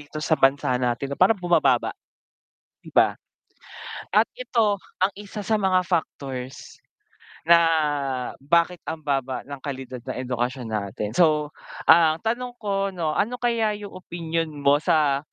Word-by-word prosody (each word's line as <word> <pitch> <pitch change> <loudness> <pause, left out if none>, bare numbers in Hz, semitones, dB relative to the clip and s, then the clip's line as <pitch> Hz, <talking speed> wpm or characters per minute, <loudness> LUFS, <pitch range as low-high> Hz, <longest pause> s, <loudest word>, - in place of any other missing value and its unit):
dito 145 +1 -11
sa 155 +1 -2
bansa 135 -2 +3
natin 125 +3 -1
no, - - -4
parang 205 +4 +5
bumababa, 175 -1 +2 0.9
'di - - -13
ba? - - +4 1.0
At - - +7
ito 225 - 0 0.2
ang 190 +1 +3
isa 205 0 -7
sa 220 +1 +1
mga 185 -1 +3
factors 135 -7 -4 0.6
na 170 +1 +7 0.8
bakit 170 +4 +2
ang 160 -1 -4
baba 135 -2 -1
ng 140 -1 -8
kalidad 130 -3 -6
ng - - -6
edukasyon 125 0 -2
natin. 105 0 -3
So, 150 -2 +2 0.3
ah, 160 -2 +6
ang - - -22
tanong 245 +2 -2
ko, 200 -3 -1
'no, 170 -5 -2
ano 230 +9 0
kaya 235 -4 0
yung 205 -1 -9
opinyon 165 -2 -3 0.2
mo 140 +1 +5
sa, 145 -4 +2
160 Hz, 145 wpm, -24 LUFS, 135-195 Hz, 1.0 s, At